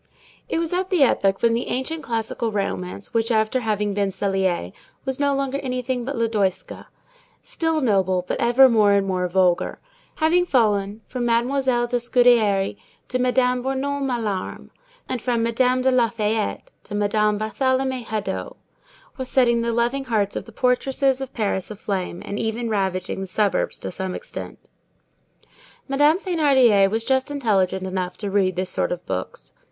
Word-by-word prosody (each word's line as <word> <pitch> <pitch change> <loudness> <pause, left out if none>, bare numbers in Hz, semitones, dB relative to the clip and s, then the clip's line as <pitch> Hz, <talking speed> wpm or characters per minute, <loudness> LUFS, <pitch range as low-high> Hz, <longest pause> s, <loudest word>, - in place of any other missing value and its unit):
It - - -1
was 330 0 -1
at 370 +1 -1
the 355 -7 +4
epoch 195 -6 +2
when 230 -1 +4
the 235 - -1
ancient 310 +5 -3
classical 230 0 -2
romance 195 -2 -4
which, 230 0 +1
after 220 +2 +2
having 210 -3 -1
been 200 -1 0
Clélie, 190 - -1 0.3
was 265 0 -3
no 285 -1 +2
longer 275 0 -1
anything 250 -2 -3
but 280 +2 -3
Lodoïska, 215 -5 -1 0.6
still 325 -1 -1
noble, 190 -6 +1
but - - -2
ever 245 +3 +6
more 215 -4 +4
and 200 -1 +2
more 185 -1 -1
vulgar, 180 -1 +1 0.4
having 340 +3 +3
fallen 210 - +1
from 245 -2 -3
Mademoiselle 240 +1 +1
de 245 +1 0
Scudéri 235 -5 +3 0.3
to 255 - -1
Madame 250 0 +2
Bournon 270 +2 -2
Malarme, 230 -8 -3 0.4
and 255 -3 -3
from 235 -2 0
Madame 250 +2 +1
de 260 - +3
Lafayette 225 -3 0
to 205 - -7
Madame 210 0 +1
Barthélemy 260 +4 0
Hadot, 215 -2 -4 0.6
was 260 -1 -5
setting 235 -3 +3
the 235 0 0
loving 240 +4 0
hearts 210 -5 0
of - - -4
the 230 - -13
portresses 265 +3 +1
of 265 - -5
Paris 200 -4 -2
aflame, 195 -4 -4
and 200 - -4
even 225 +1 -2
ravaging 190 -2 -1
the 190 - -4
suburbs 205 +1 0
to - - -6
some 185 0 -4
extent. - - -7 1.3
Madame 290 +4 +4
Thénardier 270 - +4
was 225 +2 -2
just 265 0 +1
intelligent 195 -9 0
enough 185 -1 -3
to 205 -2 -4
read 190 -2 +2
this 185 0 -2
sort - - -1
of 175 0 -4
books. - - -5
230 Hz, 160 wpm, -22 LUFS, 200-260 Hz, 1.3 s, ever